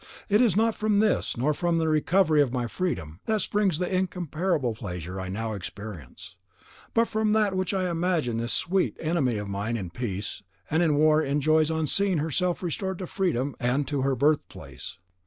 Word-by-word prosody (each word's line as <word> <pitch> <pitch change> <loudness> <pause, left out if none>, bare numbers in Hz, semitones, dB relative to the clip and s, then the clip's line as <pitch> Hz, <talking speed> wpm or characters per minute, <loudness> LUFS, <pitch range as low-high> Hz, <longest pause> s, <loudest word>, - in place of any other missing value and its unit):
It 210 +3 +4
is 230 -7 +3
not 225 +1 +3
from 215 -1 +1
this, 215 - +1
nor 140 +6 +1
from 170 +2 0
the 160 -1 +1
recovery 155 +1 +3
of 135 -4 +1
my 125 -1 -1
freedom, 110 - -3
that 220 -1 +2
springs 200 -6 +1
the 180 +1 -1
incomparable 175 -6 -1
pleasure 90 -2 -6
I 95 - -5
now 110 +3 -3
experience, 100 - -8 0.6
but 230 0 +4
from 215 -1 +1
that 210 -3 +2
which 185 -1 0
I 190 -2 0
imagine 165 -8 0
this 115 +1 -2
sweet 190 +2 +1
enemy 155 -8 0
of 105 0 -4
mine 100 +4 -2
in 90 -5 -5
peace 100 -2 -4 0.3
and 160 +3 +3
in 160 -4 +3
war 155 +1 +4
enjoys 155 +2 +2
on 160 -1 0
seeing 195 +4 +2
herself 170 +4 0
restored 190 +2 -2
to 185 - -5
freedom 145 -8 -1
and 130 +3 0
to 140 -2 -1
her 135 0 +1
birth 145 +4 +2
place. 70 +7 -9
155 Hz, 190 wpm, -26 LUFS, 120-185 Hz, 0.6 s, It